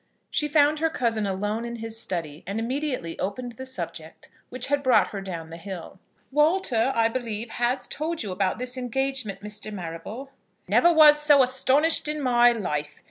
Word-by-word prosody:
She 295 - +1
found 295 0 +3
her 325 +1 +2
cousin 225 -8 -1
alone 205 +4 -2
in 235 0 -5
his 225 -1 -5
study, 165 -6 -4
and 200 +3 -2
immediately 250 - -3
opened 245 +6 -3
the 260 +3 -9
subject 170 -8 -7 0.2
which 250 0 -3
had 285 +1 0
brought 235 -8 +4
her 200 - -6
down 170 -4 -7
the 165 - -7
hill. 185 0 -8 0.3
"Walter, 295 -5 +2
I 230 -1 +4
believe, 230 -2 -4
has 245 +2 -1
told 315 0 -3
you 205 - -5
about 185 0 0
this 250 +2 -2
engagement, 250 -5 -2
Mr. 210 +1 -5
Marrable." 200 +8 -7 0.4
"Never 345 - +5
was 300 -2 +7
so 290 -2 +6
astonished 265 +6 +2
in 300 0 -1
my 245 -3 +4
life! 150 -10 -3
235 Hz, 175 wpm, -25 LUFS, 195-270 Hz, 0.4 s, was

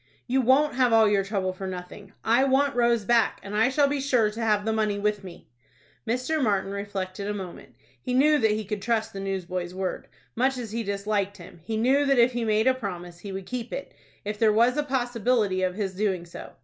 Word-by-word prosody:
"You 260 +2 +1
won't 270 +4 +3
have 250 -1 +2
all 225 -1 +6
your 205 -1 +2
trouble 195 -2 -2
for 190 +1 -6
nothing. 185 +2 -8
I 235 +4 +4
want 275 +1 +2
Rose 235 -3 +2
back, 235 0 +2
and 200 +1 -6
I 225 +4 +4
shall 280 +2 +3
be 280 0 -1
sure 245 -6 +2
to 225 +2 -6
have 210 -2 +1
the 220 - 0
money 215 -2 0
with 210 0 -1
me." 180 -2 -11 0.6
Mr. 255 +7 0
Martin 200 -3 0
reflected 200 -1 -4
a 210 - -2
moment. 185 -3 -9 0.3
He 250 -1 -2
knew 300 +3 +4
that 220 - +3
he 215 0 -1
could 210 0 -4
trust 225 -1 -1
the 195 - -6
newsboy's 185 -2 -4
word. 185 -1 -4 0.3
Much 260 +2 +1
as 235 -4 -6
he 230 +1 -2
disliked 200 -1 -2
him, 175 -1 -13
he 220 +5 -3
knew 260 +6 +3
that 275 -1 +3
if 240 +1 +5
he 240 -1 -2
made 220 0 +2
a 260 - +5
promise 180 -8 -7
he 200 +2 -8
would 190 0 -6
keep 245 +1 -5
it, - - -6 0.3
if 210 0 -4
there 220 -2 +5
was 235 +4 +3
a 295 - +1
possibility 240 -7 0
of 185 -1 0
his 195 -2 -3
doing 190 -3 -1
so. 170 - -10
215 Hz, 225 wpm, -26 LUFS, 195-245 Hz, 0.6 s, all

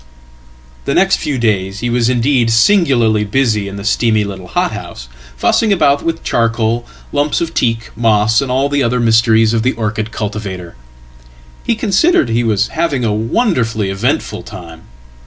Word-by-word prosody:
"The - - -1
next 190 0 +3
few 145 -3 -3
days 100 -4 -1
he 120 - -1
was 120 0 +1
indeed 125 -1 +1
singularly 115 - +3
busy 105 -2 0
in 100 0 -7
his 100 +1 -5
steamy 110 -1 +2
littlehothouse, 95 -9 -4 0.3
fussing 215 - +1
about 145 -7 +2
with 165 0 -3
charcoal, 115 0 0 0.2
lumps 145 +1 0
of 165 -1 -3
teak, 115 -5 -1
moss, 110 +1 +2
and 135 - -4
all 135 +2 +1
theother 130 -4 0
mysteries 115 -1 +3
of 115 - +1
the 130 +3 0
orchid 110 0 -3
cultivator. 100 - -6 0.9
He 230 - 0
considered 215 - +2
he 115 +1 0
was 105 -2 0
having 145 -7 -1
awonderfully 115 - 0
eventful 95 - -2
time. 85 -2 -11
115 Hz, 145 wpm, -15 LUFS, 105-135 Hz, 0.9 s, next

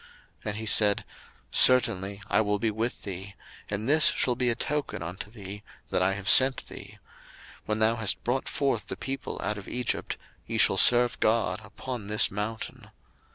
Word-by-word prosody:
02:003:012 - - -26
And 105 - -4
he 110 - -6
said, 105 -2 +4 0.5
Certainly 100 -6 +3
I - - +2
will 105 -1 0
be 110 +2 -1
with 115 +3 -3
thee; 100 0 -7 0.3
and 105 +2 -4
this 155 +2 +6
shall 125 - +2
be 125 0 0
a 115 - 0
token 145 - -2
unto 90 +5 -7
thee, 100 -2 -9 0.3
that - - +1
I 95 +1 +2
have 100 -1 -7
sent 130 0 +5
thee: - - -11 0.7
When 105 - -1
thou 110 +1 +2
hast 110 -3 +2
brought 130 +2 -2
forth 135 -6 -1
the - - -6
people 135 0 -5
out 105 -1 -2
of 100 - -13
Egypt, 125 -1 -3 0.3
ye - - -3
shall - - +4
serve 120 0 +5
God 110 -3 +1
upon 105 +1 -7
this 105 +1 +2
mountain. 105 +3 -6
110 Hz, 180 wpm, -27 LUFS, 100-120 Hz, 0.7 s, this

